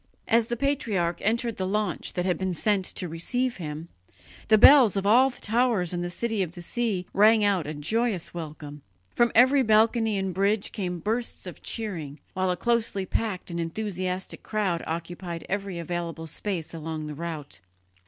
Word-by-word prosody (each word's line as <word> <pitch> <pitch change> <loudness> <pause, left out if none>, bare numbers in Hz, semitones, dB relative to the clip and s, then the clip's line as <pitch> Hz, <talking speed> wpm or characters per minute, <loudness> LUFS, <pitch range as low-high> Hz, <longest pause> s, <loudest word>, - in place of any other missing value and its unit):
As 230 0 +3
the 240 - -2
patriarch 210 -11 0
entered 230 +2 0
the 185 - -2
launch 205 -3 -1
that 180 - -1
had 180 -2 +2
been 190 -2 -2
sent 200 0 +1
to 180 - -3
receive 245 +10 -1
him, 155 -1 -6 0.6
the 215 - +6
bells 245 -3 +8
of 195 - -1
all 250 +6 +6
the 250 - -12
towers 220 -6 +1
in 175 - -2
the 175 - -3
City 220 +3 -2
of 175 -3 -2
the 175 - -9
Sea 210 -3 -1
rang 215 +2 +5
out 195 -7 +1
a 155 - -4
joyous 205 +5 -1
welcome; 150 -3 -7 0.3
from 240 0 +3
every 260 +4 +6
balcony 220 -1 +3
and 190 -1 -2
bridge 200 +3 +1
came 180 -3 -3
bursts 225 +4 -2
of 180 -5 -8
cheering, 165 -10 -5
while 185 0 0
a 180 - 0
closely 225 -3 0
packed 190 -2 -3
and 170 - -3
enthusiastic 185 +1 -3
crowd 195 -6 -1
occupied 170 +1 -5
every 195 -2 -3
available 170 -1 -4
space 170 0 -4
along 160 -1 -5
the 150 - -5
route. 155 -4 -6
190 Hz, 175 wpm, -26 LUFS, 170-220 Hz, 0.6 s, bells